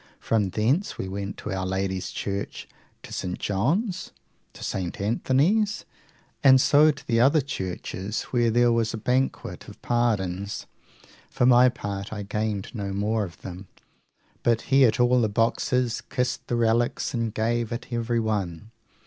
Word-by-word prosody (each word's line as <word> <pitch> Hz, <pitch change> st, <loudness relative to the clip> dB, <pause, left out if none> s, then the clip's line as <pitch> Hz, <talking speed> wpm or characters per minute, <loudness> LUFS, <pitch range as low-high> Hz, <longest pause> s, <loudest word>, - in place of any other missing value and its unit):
From 105 Hz, -4 st, +1 dB
thence 120 Hz, -, 0 dB
we 95 Hz, -, -4 dB
went 100 Hz, +1 st, -5 dB
to -, -, -6 dB
Our 95 Hz, -1 st, -2 dB
Lady's 95 Hz, 0 st, -2 dB
Church, 100 Hz, 0 st, -4 dB, 0.4 s
to -, -, -10 dB
St. 90 Hz, -1 st, -3 dB
John's, 170 Hz, -, -1 dB, 0.4 s
to -, -, -10 dB
St. 90 Hz, -2 st, -3 dB
Anthony's, 150 Hz, -, +1 dB, 0.6 s
and 130 Hz, -2 st, +8 dB
so 150 Hz, +4 st, +5 dB
to 145 Hz, -2 st, -3 dB
the 115 Hz, -1 st, +1 dB
other 140 Hz, +6 st, +5 dB
churches, 95 Hz, -4 st, -4 dB
where 120 Hz, -2 st, +3 dB
there 120 Hz, +1 st, +4 dB
was 115 Hz, -1 st, +1 dB
a -, -, -4 dB
banquet 125 Hz, +4 st, -1 dB
(bank) -, -, -15 dB
of -, -, -13 dB
pardons. 100 Hz, -5 st, -1 dB, 0.6 s
For 125 Hz, -, +1 dB
my 125 Hz, 0 st, +7 dB
part, 100 Hz, -4 st, -5 dB
I 105 Hz, -1 st, -4 dB
gained 105 Hz, -1 st, -3 dB
no 100 Hz, -4 st, -4 dB
more 105 Hz, +2 st, 0 dB
of 85 Hz, -, -13 dB
them, 95 Hz, +1 st, -8 dB, 0.7 s
but 115 Hz, -1 st, +2 dB
he 135 Hz, -1 st, +7 dB
at 115 Hz, -, +2 dB
all 125 Hz, 0 st, +4 dB
the 110 Hz, -, +1 dB
boxes 115 Hz, +2 st, +1 dB
kissed 125 Hz, -2 st, -2 dB
the 120 Hz, -, 0 dB
relics, 120 Hz, +1 st, +1 dB
and 115 Hz, -2 st, -1 dB
gave 115 Hz, +1 st, -1 dB
at 120 Hz, +1 st, -5 dB
everyone. 110 Hz, -5 st, -1 dB
115 Hz, 155 wpm, -25 LUFS, 100-125 Hz, 0.7 s, and